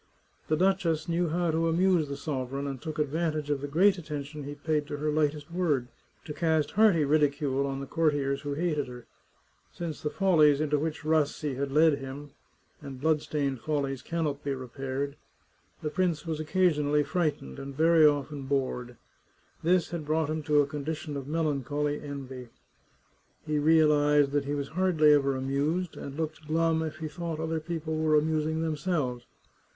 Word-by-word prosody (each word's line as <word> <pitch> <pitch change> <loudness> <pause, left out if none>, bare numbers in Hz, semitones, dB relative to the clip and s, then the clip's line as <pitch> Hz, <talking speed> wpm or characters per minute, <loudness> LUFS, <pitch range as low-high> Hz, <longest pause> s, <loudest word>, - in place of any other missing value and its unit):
The 155 - +1
duchess 180 -3 +1
knew 170 0 0
how 170 +1 0
to 165 +1 +1
amuse 175 -1 +3
the 140 - -4
sovereign, 140 -2 -3
and 135 -3 -5
took 155 0 -5
advantage 155 0 -1
of 140 -2 0
the 145 - -3
great 185 +6 +3
at 165 - -11
tention 145 -1 -5
he 145 +1 -6
paid 150 0 -1
to 145 - -4
her 150 +1 -1
lightest 150 +1 0
word, 150 -9 0 0.4
to 150 - -5
cast 160 -1 +1
hearty 205 -8 +4
ridicule 140 -2 +1
on 135 0 -3
the - - -4
courtiers 145 -3 0
who 145 -1 -3
hated 150 -3 -1
her. 125 -1 -10 0.7
Since 165 -3 -6
the 150 - -1
follies 155 -7 +4
into 150 -1 +1
which 155 0 -3
Rassi 155 -2 +1
had 140 +1 -2
led 155 0 +4
him 135 +2 -8 0.3
— - - -38
and 135 -3 -8
bloodstained 145 -3 0
follies 140 -4 -2
cannot 155 -2 -2
be 140 -1 -1
re 130 -1 -7
paired— 135 +2 -4 0.7
the 150 - -2
prince 175 -3 0
was 160 -2 -3
occasionally 150 -3 +2
frightened, 150 - -2
and 140 0 -7
very 165 0 +5
often 145 -2 +2
bored. 125 -3 -2 0.6
This 175 +1 +2
had 170 -2 -3
brought 155 0 +1
him 155 0 -2
to 150 -1 +4
a - - +1
condition 150 +1 -5
of 140 -2 -4
melan 150 -3 0
choly 145 +2 -2
envy. 135 -3 -7 1.0
He 150 -1 0
realized 150 -2 +4
that 145 -1 0
he 145 +1 -2
was 140 -1 -3
hardly 160 -4 +4
ever 140 -2 +2
amused, 145 +7 -1
and 140 +1 -7
looked 155 -1 -4
glum 160 +1 +2
if 155 -1 -4
he 160 -1 -4
thought 165 0 -5
other 160 0 -1
people 160 -1 -4
were 155 0 +2
amusing 155 +1 0
themselves. 150 -6 -2
150 Hz, 175 wpm, -28 LUFS, 140-160 Hz, 1.0 s, very